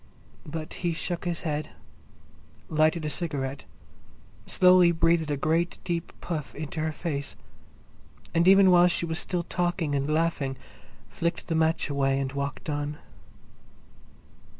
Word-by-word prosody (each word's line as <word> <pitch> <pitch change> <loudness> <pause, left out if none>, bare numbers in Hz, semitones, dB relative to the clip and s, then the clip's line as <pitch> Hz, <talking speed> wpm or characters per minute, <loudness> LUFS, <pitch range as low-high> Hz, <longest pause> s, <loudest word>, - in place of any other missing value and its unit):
But 155 +1 -5
he 175 -2 0
shook 170 +1 -4
his 175 -1 -2
head, 150 -1 -3 1.0
lighted 155 +1 +2
a - - 0
cigarette, 140 - -3 0.8
slowly 180 -1 +6
breathed 165 -1 +2
a 145 - 0
great 165 +4 0
deep 170 -2 -3
puff 160 -5 -4
into 155 +1 -5
her 155 0 0
face, 145 -3 -4 1.0
and 170 +1 +3
even 195 0 +7
while 175 0 +7
she 170 -1 0
was 165 0 -2
still 175 -2 -2
talking 175 -3 -1
and 140 +1 0
laughing, 155 -4 0 0.5
flicked 170 0 -3
the - - +1
match 160 0 +2
away 135 -2 +1
and 135 -1 -2
walked 140 +2 -4
on. 145 0 -3
160 Hz, 135 wpm, -27 LUFS, 145-170 Hz, 1.0 s, even